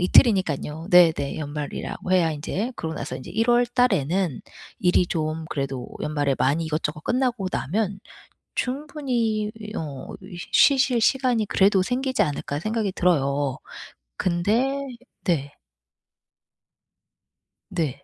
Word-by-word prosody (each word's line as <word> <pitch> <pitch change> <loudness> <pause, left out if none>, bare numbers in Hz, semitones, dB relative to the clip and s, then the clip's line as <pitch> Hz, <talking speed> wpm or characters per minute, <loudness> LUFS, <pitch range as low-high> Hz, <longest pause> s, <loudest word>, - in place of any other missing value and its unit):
이틀이니깐요 180 - +3
네네. 165 -6 +5
연말이라고 150 +4 -4
해야 170 -3 +4
인제 195 - -3
그러고 160 -1 -4
나서 130 - -4
이제 130 - -9
1 225 +1 +1
월 240 0 +4
달에는 195 - +1 0.4
일이 180 0 +3
좀 160 -1 -2
그래도 135 -3 -3
연말에 145 -2 0
많이 150 +5 +2
이것저것 155 0 -3
끝나고 245 -6 0
나면 195 +5 -1 0.5
충분히 250 -6 -1 0.3
어 140 -4 -6
이 185 -1 -10 0.2
'쉬실 265 -3 +5
시간이 245 -2 +2
그래도 195 -1 +4
생기지 260 +2 0
않을까.' 145 -3 -2
생각이 215 -1 -1
들어요. 140 -6 +1 0.6
근데 230 +11 +1 0.4
네. 145 -7 0 2.2
네. 155 -7 -2
180 Hz, 255 characters per minute, -24 LUFS, 150-230 Hz, 2.2 s, 네네